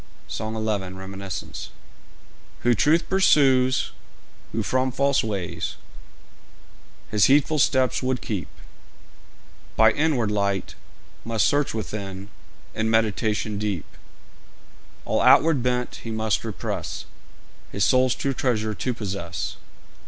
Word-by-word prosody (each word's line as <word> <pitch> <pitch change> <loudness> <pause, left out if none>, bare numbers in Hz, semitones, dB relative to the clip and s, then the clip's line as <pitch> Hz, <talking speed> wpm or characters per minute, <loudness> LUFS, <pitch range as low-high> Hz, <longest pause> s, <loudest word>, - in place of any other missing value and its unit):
"' - - -30
SONG 110 0 -4
XI. 105 -4 -2
REMINISCENCE.[J] 95 0 -7 0.9
Who 120 - +4
truth 155 +9 +3
pursues, 135 -9 +4 0.6
who - - -1
from 130 0 +1
false 140 +2 +2
ways 100 -6 -3 1.4
His 105 -1 +4
heedful 145 +3 +3
steps 130 -2 +2
would 130 -1 0
keep, 100 -6 -4 1.3
By 110 0 +6
inward 140 -8 +1
light 100 -2 -1 0.5
must 115 -2 +1
search 145 -4 +1
within 100 -2 -5 0.4
In 110 0 -1
meditation 110 -1 0
deep; 100 -6 -2 1.2
All - - +1
outward 160 -5 +5
bent 125 0 -1
he 115 - -7
must 110 -1 0
repress - - -4 0.7
His 100 - +1
soul's 130 -1 +3
true 135 - -1
treasure 110 -4 0
to 125 +4 -2
possess. 95 -7 -4
110 Hz, 110 wpm, -24 LUFS, 105-130 Hz, 1.4 s, By